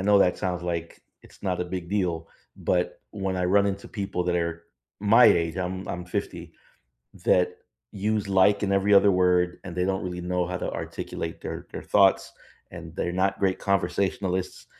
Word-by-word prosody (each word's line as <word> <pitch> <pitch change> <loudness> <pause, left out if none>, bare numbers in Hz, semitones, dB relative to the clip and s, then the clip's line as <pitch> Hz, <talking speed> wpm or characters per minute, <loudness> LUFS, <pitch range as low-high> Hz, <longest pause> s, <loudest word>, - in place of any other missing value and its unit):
know 100 +1 +4
that 90 - +3
sounds 90 -3 -2
like 85 -1 -4 0.2
it's - - -19
not 90 -2 -1
a - - 0
big 90 0 -6
deal, 85 -5 -1 0.3
but - - -1
when 95 -2 -3
I 90 - 0
run 100 +2 +4
into 100 0 -3
people 95 -4 -3
that 90 -1 +1
are 85 0 -2 0.4
my 110 +4 +6
age, 85 +1 +3
I'm 95 +1 -3
I'm 90 0 -4
50, 90 -3 -5 0.7
that 90 0 +3 0.4
use 105 0 -1
like 100 +1 +4
in 100 -2 +1
every 100 +1 +3
other 100 0 +7
word, 90 -1 +2
and 90 - -7
they 90 0 0
don't 95 -1 -1
really 90 -1 -4
know 90 0 -1
how 90 - -3
to - - -3
articulate 80 0 -5
their - - -6
their - - -7
thoughts, - - +3 0.4
and - - -9
they're 85 - -1
not 95 +1 0
great 95 -2 +1
conversationalists. 95 0 -1
90 Hz, 180 wpm, -26 LUFS, 90-100 Hz, 0.7 s, other